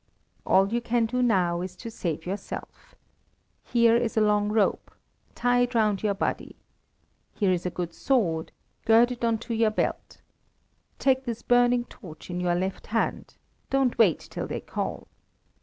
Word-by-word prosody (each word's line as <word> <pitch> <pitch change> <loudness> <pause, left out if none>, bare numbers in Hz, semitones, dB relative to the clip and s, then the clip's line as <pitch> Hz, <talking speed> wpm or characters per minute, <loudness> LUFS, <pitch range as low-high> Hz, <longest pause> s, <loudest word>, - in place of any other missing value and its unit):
"All 195 +3 +3
you 240 - +1
can 235 0 +1
do 250 +3 -1
now 180 -7 +2
is 180 0 -6
to 230 - -8
save 165 -7 -4
yourself. 195 +3 -7 0.7
Here 235 -1 +3
is 235 -1 0
a - - +5
long 210 -1 +2
rope; 210 -1 +1 0.5
tie 245 0 +2
it 245 0 0
round 210 -4 +2
your 205 -2 0
body. 195 - -3 0.8
Here 200 -3 +2
is 180 0 -1
a - - 0
good 175 -1 -5
sword; 170 -13 0 0.3
gird 230 +2 +5
it 240 -1 -6
on 230 -1 +2
to 235 - -3
your 225 -1 +3
belt. 215 - -3 0.8
Take 265 -1 +1
this 235 -2 -5
burning 245 0 +3
torch 175 -7 -12
in 175 - -3
your 175 -1 +1
left 190 +2 -3
hand; 225 +1 -2 0.3
don't 270 -2 +1
wait 200 -8 +5
till - - -6
they - - -4
call. - - -5
220 Hz, 165 wpm, -26 LUFS, 185-240 Hz, 0.8 s, a